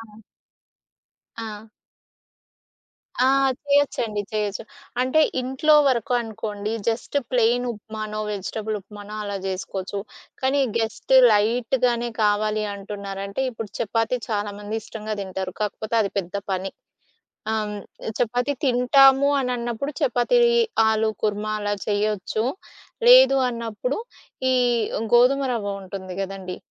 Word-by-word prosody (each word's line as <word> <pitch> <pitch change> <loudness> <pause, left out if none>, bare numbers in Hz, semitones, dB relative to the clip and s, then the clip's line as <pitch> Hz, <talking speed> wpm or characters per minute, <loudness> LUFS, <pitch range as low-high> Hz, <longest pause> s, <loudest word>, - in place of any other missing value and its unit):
ఆ! 215 -2 -14 1.2
ఆ! 220 -1 -7 1.6
ఆ! - - +5 0.4
చేయొచ్చండి 260 -7 +1
చేయొచ్చు. 210 -2 -2 0.4
అంటే 260 +5 +3 0.2
ఇంట్లో 265 +4 +2
వరకు 245 -1 0
అనుకోండి, 215 -2 -4 0.2
జస్ట్ 230 +5 -2
ప్లెయిన్ 245 0 +2
ఉప్మానో, 215 0 -6
వెజిటబుల్ 210 +2 -3
ఉప్మానో 205 +1 -10
అలా 200 0 -3
జేసుకోవచ్చు. 190 +1 -4 0.4
కానీ 270 +2 +2 0.2
గెస్ట్ 225 +3 -1 0.2
లైట్‌గానే 240 +3 +1
కావాలి 215 +1 +1
అంటున్నారంటే 200 +1 -6
ఇప్పుడు 225 -3 -7
చపాతీ 225 +3 0
చాలామంది 205 0 -3
ఇష్టంగా 215 0 -5
తింటారు. 190 -1 -5
కాకపోతే 215 +2 -2
అది 200 - -2
పెద్ద 180 -1 -5 0.2
పని. 190 +1 -2 0.8
అం, 215 -1 -1 0.5
చపాతీ 245 +4 0
తింటాము 270 +2 +5
అనిన్నప్పుడు 250 +1 -2
చపాతీ 255 - +2 0.5
ఆలు 220 0 +2
కుర్మ 210 0 -1
అలా 205 0 -1
చెయొచ్చు. 210 +1 0 0.6
లేదు - - +8
అన్నప్పుడు 230 +2 -3 0.5
ఈ - - +3 0.6
గోధుమ 250 +3 +5
రవ్వ 210 -4 -2
ఉంటుంది 185 -1 -7
గదండీ! 190 -1 -5
220 Hz, 105 wpm, -23 LUFS, 205-245 Hz, 1.6 s, లేదు